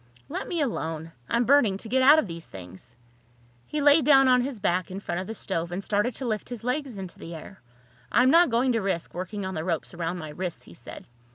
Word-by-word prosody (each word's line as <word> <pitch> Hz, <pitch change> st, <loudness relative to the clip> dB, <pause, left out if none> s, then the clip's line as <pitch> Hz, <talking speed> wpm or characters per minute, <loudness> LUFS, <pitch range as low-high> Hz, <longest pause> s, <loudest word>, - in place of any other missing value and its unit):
"Let -, -, -4 dB
me 340 Hz, -3 st, -1 dB
alone. 165 Hz, -, -3 dB, 0.2 s
I'm 235 Hz, +1 st, +2 dB
burning 240 Hz, -8 st, +4 dB
to 220 Hz, -, -9 dB
get 260 Hz, +4 st, +2 dB
out 290 Hz, +4 st, +8 dB
of 315 Hz, -, +2 dB
these 170 Hz, -3 st, -8 dB
things." 95 Hz, +5 st, -12 dB, 0.7 s
He 300 Hz, -, -3 dB
lay 290 Hz, +2 st, +6 dB
down 270 Hz, -1 st, +6 dB
on 250 Hz, -1 st, +5 dB
his 255 Hz, -3 st, -4 dB
back 185 Hz, -2 st, 0 dB
in 190 Hz, +1 st, -5 dB
front 175 Hz, -2 st, -3 dB
of 190 Hz, -, -7 dB
the 225 Hz, -, -5 dB
stove 170 Hz, -4 st, -3 dB
and 185 Hz, +3 st, -4 dB
started 210 Hz, +4 st, 0 dB
to 265 Hz, -, -4 dB
lift 215 Hz, -3 st, -3 dB
his 240 Hz, -2 st, -7 dB
legs 250 Hz, -2 st, -2 dB
into 190 Hz, -2 st, -8 dB
the 165 Hz, 0 st, -8 dB
air. 190 Hz, +4 st, -11 dB, 0.5 s
"I'm 255 Hz, +2 st, +5 dB
not 340 Hz, +2 st, +6 dB
going 245 Hz, +2 st, +2 dB
to 225 Hz, -2 st, 0 dB
risk 190 Hz, -4 st, -2 dB
working 190 Hz, +3 st, -5 dB
on 190 Hz, -, -4 dB
the 155 Hz, -, -3 dB
ropes 165 Hz, -1 st, -3 dB
around 170 Hz, +1 st, -3 dB
my 155 Hz, -3 st, -7 dB
wrists," 175 Hz, +3 st, -5 dB
he -, -, -15 dB
said. -, -, -11 dB
205 Hz, 240 wpm, -26 LUFS, 175-255 Hz, 0.7 s, out